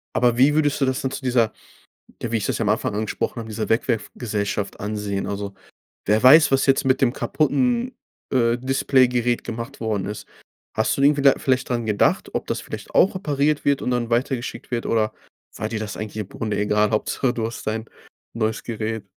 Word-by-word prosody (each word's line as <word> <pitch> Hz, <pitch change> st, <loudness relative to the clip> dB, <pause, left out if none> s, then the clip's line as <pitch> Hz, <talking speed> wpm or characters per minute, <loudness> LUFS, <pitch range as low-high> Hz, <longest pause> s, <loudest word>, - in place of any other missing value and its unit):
Aber 120 Hz, -1 st, +3 dB
wie 140 Hz, +4 st, +5 dB
würdest 145 Hz, -2 st, +1 dB
du -, -, +3 dB
das 130 Hz, 0 st, 0 dB
denn 130 Hz, -, -2 dB
zu -, -, -6 dB
dieser 120 Hz, -3 st, +2 dB, 0.7 s
ja, 115 Hz, -, -3 dB
wie 115 Hz, -, +2 dB
ich 100 Hz, -, -3 dB
das -, -, -1 dB
am 105 Hz, -, +1 dB
Anfang 105 Hz, -1 st, 0 dB
angesprochen 110 Hz, +2 st, -2 dB
habe, 110 Hz, -1 st, -7 dB
dieser 110 Hz, 0 st, -4 dB
Wegwerfgesellschaft 105 Hz, -4 st, -2 dB
ansehen? 105 Hz, -1 st, -3 dB
Also 100 Hz, -1 st, -4 dB, 0.5 s
wer 105 Hz, +2 st, +3 dB
weiß, 150 Hz, +4 st, +7 dB
was 135 Hz, 0 st, +3 dB
jetzt 135 Hz, +1 st, +3 dB
mit 130 Hz, 0 st, +2 dB
dem 125 Hz, -2 st, +3 dB
kaputten, 245 Hz, -, 0 dB, 0.4 s
äh, 120 Hz, -2 st, +2 dB
Displaygerät 125 Hz, -2 st, +2 dB
gemacht 115 Hz, +4 st, -6 dB
worden 110 Hz, -4 st, -1 dB
ist? 105 Hz, +1 st, -6 dB, 0.5 s
Hast 110 Hz, +1 st, +1 dB
du 140 Hz, -, -2 dB
denn 140 Hz, -, +7 dB
irgendwie 145 Hz, -1 st, -2 dB
da 140 Hz, -, +7 dB
vielleicht 130 Hz, 0 st, 0 dB
dran 120 Hz, -2 st, -1 dB
gedacht, 105 Hz, -2 st, +1 dB
ob -, -, -2 dB
das -, -, -2 dB
vielleicht -, -, -8 dB
auch 190 Hz, +1 st, +4 dB
repariert 150 Hz, -4 st, 0 dB
wird 140 Hz, -1 st, +2 dB
und -, -, -1 dB
dann 120 Hz, -1 st, -1 dB
weitergeschickt 125 Hz, +1 st, -2 dB
wird, 120 Hz, -1 st, -2 dB
oder 110 Hz, -2 st, +1 dB, 0.4 s
war -, -, -3 dB
dir 110 Hz, -, -3 dB
das 105 Hz, -2 st, -5 dB
eigentlich 110 Hz, 0 st, -6 dB
im 105 Hz, -3 st, -4 dB
Grunde 105 Hz, -2 st, -3 dB
egal, 105 Hz, 0 st, +2 dB
Hauptsache 120 Hz, +3 st, 0 dB
du 115 Hz, -2 st, -2 dB
hast 115 Hz, +1 st, -6 dB
dein 110 Hz, +1 st, -2 dB, 0.5 s
neues 110 Hz, -1 st, -1 dB
Gerät. 110 Hz, -2 st, -4 dB
115 Hz, 200 wpm, -22 LUFS, 110-135 Hz, 0.7 s, weiß